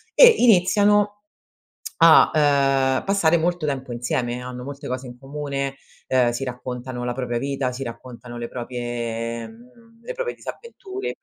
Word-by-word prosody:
e -, -, +10 dB
iniziano 205 Hz, 0 st, +4 dB, 0.8 s
a 165 Hz, -1 st, +7 dB, 0.7 s
,uhm, -, -, -5 dB
passare 170 Hz, -4 st, +3 dB
molto 175 Hz, -1 st, -1 dB
tempo 130 Hz, -3 st, -3 dB
insieme, 120 Hz, +1 st, -2 dB
hanno 125 Hz, 0 st, -7 dB
molte 140 Hz, +1 st, -8 dB
cose 130 Hz, 0 st, -4 dB
in 120 Hz, 0 st, -11 dB
comune, 140 Hz, 0 st, -4 dB, 0.3 s
uhm, 125 Hz, -2 st, +3 dB
si 120 Hz, +3 st, -4 dB
raccontano 125 Hz, 0 st, -5 dB
la 125 Hz, -, -1 dB
propria 120 Hz, -2 st, -3 dB
vita, 135 Hz, -1 st, -2 dB
si 130 Hz, +2 st, -5 dB
raccontano 120 Hz, 0 st, -9 dB
le 120 Hz, 0 st, -5 dB
proprie 120 Hz, -2 st, -4 dB, 0.5 s
le 235 Hz, -, -6 dB
proprie -, -, -3 dB
disavventure 395 Hz, -4 st, -7 dB
130 Hz, 140 wpm, -23 LUFS, 120-165 Hz, 0.8 s, e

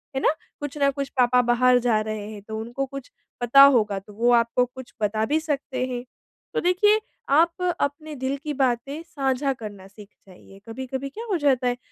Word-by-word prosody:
है 265 Hz, -, -1 dB
ना। -, -, +3 dB, 0.3 s
कुछ 290 Hz, 0 st, -5 dB
ना 280 Hz, -1 st, +3 dB
कुछ 275 Hz, 0 st, -4 dB
पापा 250 Hz, 0 st, +4 dB
बाहर 245 Hz, +1 st, +4 dB
जा 235 Hz, -3 st, +2 dB
रहे 215 Hz, -1 st, -5 dB
हैं 210 Hz, -2 st, -9 dB
तो 220 Hz, +1 st, -6 dB
उनको 240 Hz, +5 st, -3 dB
कुछ 275 Hz, -1 st, -9 dB, 0.3 s
पता 245 Hz, +3 st, +7 dB
होगा, 220 Hz, -8 st, +4 dB
तो 205 Hz, +2 st, -16 dB
वो 235 Hz, +4 st, +2 dB
आपको 235 Hz, +1 st, +3 dB
कुछ 250 Hz, +1 st, -12 dB
बता 215 Hz, +1 st, +1 dB
भी 300 Hz, +6 st, +1 dB
सकते 275 Hz, -4 st, -2 dB
हैं। 245 Hz, -1 st, -4 dB, 0.5 s
तो -, -, 0 dB
देखिए, 415 Hz, +4 st, +4 dB, 0.3 s
आप 335 Hz, +5 st, +3 dB, 0.2 s
अपने 300 Hz, +2 st, -3 dB
दिल 265 Hz, +1 st, -2 dB
की 300 Hz, -2 st, -3 dB
बातें 270 Hz, +2 st, -1 dB
साझा 275 Hz, -3 st, -1 dB
करना 205 Hz, -6 st, -9 dB
सीख 205 Hz, 0 st, -14 dB, 0.2 s
जाइए। 195 Hz, +1 st, -16 dB
कभी-कभी 260 Hz, +3 st, -5 dB
क्या 445 Hz, -, -8 dB
हो 370 Hz, -, +2 dB
जाता 265 Hz, -4 st, +2 dB
है, 245 Hz, 0 st, 0 dB
255 Hz, 195 wpm, -24 LUFS, 230-280 Hz, 0.5 s, पता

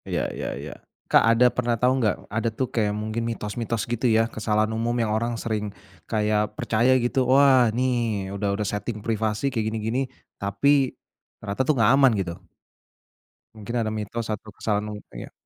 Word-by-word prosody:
Iya -, -, -1 dB
iya -, -, -4 dB
iya, -, -, -7 dB, 0.4 s
Kak -, -, +7 dB
ada 115 Hz, +2 st, +5 dB
pernah 120 Hz, -1 st, 0 dB
tahu 125 Hz, +3 st, +3 dB
nggak, 110 Hz, -3 st, +2 dB, 0.2 s
ada 115 Hz, +1 st, 0 dB
tuh 125 Hz, +4 st, -2 dB
kayak 110 Hz, -3 st, +1 dB
mungkin 110 Hz, +2 st, -3 dB
mitos-mitos 115 Hz, 0 st, -3 dB
gitu 120 Hz, +1 st, -3 dB
ya 115 Hz, 0 st, +4 dB
kesalahan 110 Hz, 0 st, 0 dB
umum 115 Hz, +2 st, -1 dB
yang 110 Hz, -3 st, 0 dB
orang 115 Hz, +2 st, -1 dB
sering 110 Hz, -2 st, -2 dB, 0.4 s
kayak 105 Hz, 0 st, 0 dB
percaya 120 Hz, +4 st, +3 dB
gitu, 125 Hz, +1 st, 0 dB
"Wah 130 Hz, -3 st, +6 dB
ini 120 Hz, +4 st, 0 dB, 0.5 s
udah 100 Hz, 0 st, -1 dB
udah 105 Hz, +1 st, -2 dB
setting 105 Hz, +3 st, -3 dB
privasi 110 Hz, +3 st, -1 dB
kayak 110 Hz, -3 st, -1 dB
gini-gini 110 Hz, +3 st, -1 dB, 0.4 s
tapi, 130 Hz, +8 st, +2 dB, 0.4 s
ternyata 100 Hz, +3 st, -3 dB
tuh 135 Hz, +4 st, +2 dB
nggak 115 Hz, 0 st, +5 dB
aman," 135 Hz, -1 st, +6 dB
gitu. 90 Hz, -1 st, -4 dB, 1.1 s
Mungkin 110 Hz, +2 st, -6 dB
ada 110 Hz, -, -2 dB
mitos 110 Hz, +1 st, -4 dB
atau 105 Hz, 0 st, -5 dB
kesalahan 105 Hz, -1 st, -1 dB
mu 105 Hz, -, -5 dB, 0.2 s
kayak -, -, -9 dB
110 Hz, 170 wpm, -24 LUFS, 105-120 Hz, 1.1 s, Kak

